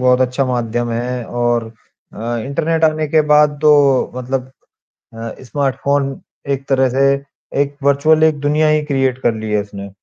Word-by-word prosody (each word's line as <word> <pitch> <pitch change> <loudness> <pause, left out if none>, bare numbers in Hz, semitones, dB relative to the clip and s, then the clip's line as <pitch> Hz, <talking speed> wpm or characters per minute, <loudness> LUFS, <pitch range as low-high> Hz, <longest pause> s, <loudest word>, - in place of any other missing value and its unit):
बहुत 125 0 +3
अच्छा 130 +2 +1
माध्यम 120 -1 -2
है 120 +1 -3
और 120 -1 0 0.5
अ, 120 +2 -4
इंटरनेट 160 +3 0
आने 155 0 +1
के 155 +1 +3
बाद 150 -1 +4
तो 150 -1 +6 0.4
मतलब 130 0 -3 0.7
अ, 115 0 -6
स्मार्टफ़ोन 135 +2 -1 0.3
एक 135 0 -5
तरह 130 -1 +3
से 135 +2 +1 0.6
एक 145 0 -3
वर्चुअल 155 +3 +3
एक 155 -2 +3
दुनिया 150 +2 +1
ही 155 0 +2
क्रिएट 135 -3 0
कर 120 - +2
ली 110 -1 -5
है 105 -1 +2
इसने। 100 -1 -9
135 Hz, 160 wpm, -17 LUFS, 120-145 Hz, 0.7 s, तो